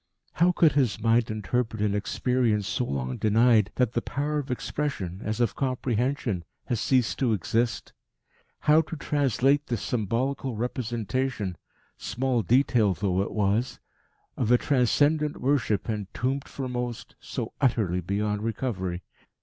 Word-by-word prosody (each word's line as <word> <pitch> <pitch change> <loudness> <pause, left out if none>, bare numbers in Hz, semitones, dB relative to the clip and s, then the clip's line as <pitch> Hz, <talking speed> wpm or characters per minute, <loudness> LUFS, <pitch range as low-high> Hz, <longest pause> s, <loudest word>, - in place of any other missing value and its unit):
How 175 +2 +4
could 165 -3 +4
his 130 -8 +1
mind 115 +1 +2
interpret 110 +1 -2
an 105 -1 +1
experience 110 0 0
so 125 - -1
long 65 - -3
denied 110 -1 +4
that 125 -2 +1
the 120 - 0
power 145 +6 -2
of 140 -1 -6
expression, 125 -8 -3
as 110 +2 -2
of 120 -4 +1
comprehension, 125 -5 -1 0.2
has 120 -4 -1
ceased 130 -4 +1
to 125 -4 +2
exist? 115 +5 -1 0.7
How 155 +2 +5
translate 145 -2 +1
this 120 -3 -2
symbolical 125 +3 -1
representation, 120 -2 -2 0.4
small 125 +1 0
detail 115 -4 +3
though 95 -1 0
it 100 - -3
was, 105 +4 0 0.6
of 115 - -1
a 125 - +6
transcendent 145 +4 +2
worship 125 -7 +1
entombed 120 +6 -2
for 135 -2 -5
most 125 -2 -4
so - - -5
utterly 105 -9 +2
beyond 105 +3 -1
recovery? 100 -6 -3
120 Hz, 135 wpm, -27 LUFS, 105-135 Hz, 0.7 s, a